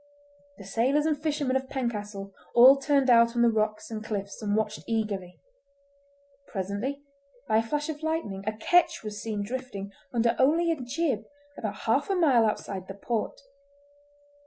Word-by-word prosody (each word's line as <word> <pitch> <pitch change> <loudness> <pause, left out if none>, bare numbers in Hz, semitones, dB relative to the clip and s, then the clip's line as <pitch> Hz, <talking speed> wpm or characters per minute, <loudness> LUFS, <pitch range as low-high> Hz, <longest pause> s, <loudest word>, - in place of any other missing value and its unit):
The 200 - -10
sailors 250 +9 +1
and 315 -1 +2
fishermen 295 -3 -1
of 265 0 -1
Pencastle 210 -6 -4 0.2
all 255 +3 +9
turned 275 -1 +2
out 235 -1 +5
on 240 - +3
the 235 - +5
rocks 215 0 -1
and 215 -1 -5
cliffs 200 -2 -5
and 205 -1 0
watched 215 -1 -1
eagerly. 205 -5 -2 1.1
Presently, 205 +9 -4 0.4
by 220 - +3
a - - +4
flash 295 +6 -2
of 310 -1 -5
lightning, 315 -12 -2
a 215 - 0
"ketch" 350 +8 +3
was 210 -1 -6
seen 215 -2 -3
drifting 210 -4 -5 0.2
under 235 -1 +2
only 330 +5 +3
a 315 -5 -2
jib 250 -3 -1 0.3
about 210 -5 -5
half 270 - +1
a 390 - +2
mile 265 -11 +4
outside 195 -3 -4
the 195 - -7
port. 220 +2 -3
230 Hz, 160 wpm, -27 LUFS, 210-275 Hz, 1.1 s, all